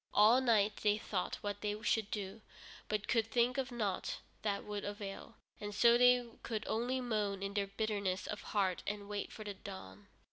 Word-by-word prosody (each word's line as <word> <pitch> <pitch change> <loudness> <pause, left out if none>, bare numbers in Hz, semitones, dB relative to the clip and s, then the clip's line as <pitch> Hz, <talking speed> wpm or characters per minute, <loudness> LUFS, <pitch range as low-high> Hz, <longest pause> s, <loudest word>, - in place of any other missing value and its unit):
All 220 +5 +7
night 215 -4 +3
they 210 0 +2
thought 195 -3 -2
what 205 0 -3
they 210 0 -1
should 220 -2 +2
do, 205 0 -4 0.5
but 210 -1 -1
could 225 -2 +2
think 245 +3 +2
of 265 -1 -2
nought 210 -6 -1 0.2
that 200 -2 -1
would 205 -1 -4
avail, 205 -1 -6 0.2
and 205 0 -5
so 235 +3 +7
they 250 0 +6 0.2
could 225 -2 -3
only 245 +3 0
moan 210 -5 -1
in 200 0 -3
their 200 -1 0
bitterness 200 -2 -1
of 210 - -4
heart 190 -4 0
and 205 0 -3
wait 205 0 -3
for 215 - -8
the 205 -1 -4
dawn. 105 - -10
210 Hz, 185 wpm, -35 LUFS, 200-225 Hz, 0.5 s, All